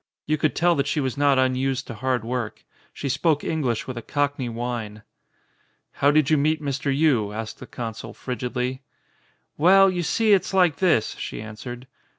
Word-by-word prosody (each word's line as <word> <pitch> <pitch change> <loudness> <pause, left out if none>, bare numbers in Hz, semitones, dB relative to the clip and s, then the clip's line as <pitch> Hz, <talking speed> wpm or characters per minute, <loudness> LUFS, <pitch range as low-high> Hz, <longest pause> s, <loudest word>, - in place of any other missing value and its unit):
You 155 - +1
could 155 0 0
tell 175 +1 +3
that 140 0 0
she 150 - 0
was 130 -3 -1
not 140 -1 +3
unused 130 +1 +1
to 120 - -7
hard 125 0 -1
work. 120 -2 -4 0.3
She - - -8
•spoke 150 +2 +1
English 135 -8 -1
with 125 -2 -5
a - - -8
Cockney 145 -1 -1
whine. 115 -3 -5 0.9
"How 140 - +2
did 150 -1 +3
you 155 - +5
meet 155 +2 +2
Mr. 140 -1 -2
Yii?" 130 -8 +2
asked 110 0 -6
the - - -10
consul 115 -2 -6
frigidly. 125 +1 -4 0.8
"Well, 195 +4 +6
you 180 -1 -2
see, 215 +5 +2
it's 190 0 +1
like 180 -5 +4
this," 170 - +2
she - - -5
answered. 120 +3 -8
135 Hz, 175 wpm, -24 LUFS, 120-155 Hz, 0.9 s, Well